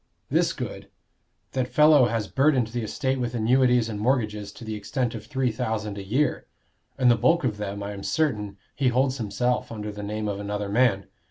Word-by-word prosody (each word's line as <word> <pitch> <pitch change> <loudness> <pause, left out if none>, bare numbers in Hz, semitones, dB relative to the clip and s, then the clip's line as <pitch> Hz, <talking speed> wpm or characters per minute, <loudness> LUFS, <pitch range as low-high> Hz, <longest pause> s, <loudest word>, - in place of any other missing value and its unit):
This - - +3
good: - - -6 0.6
that 130 -1 -1
fellow 150 -1 +6
has 115 -3 -1
burdened 135 -4 +2
the 120 +1 -3
estate 130 +4 -1
with 120 -1 -2
annuities 125 +1 +3
and 105 -2 -5
mortgages 105 -4 0
to 115 - -11
the 110 - -4
extent 115 +4 -2
of 110 -2 -8
three 130 -4 0
thousand 110 -3 -3
a - - -6
year; 125 +8 0 0.5
and 125 -2 +5
the - - +5
bulk 165 +9 +2
of 115 -5 -1
them, 100 -1 -4
I 100 - -4
am 100 - -8
certain, 105 -9 -1 0.2
he 135 - +1
holds 130 +2 +1
himself 120 +4 -1
under 105 -2 -5
the 105 0 -8
name 105 +1 -3
of 100 -1 -3
another 105 0 -3
man. 105 -3 +2
115 Hz, 195 wpm, -25 LUFS, 105-130 Hz, 0.6 s, fellow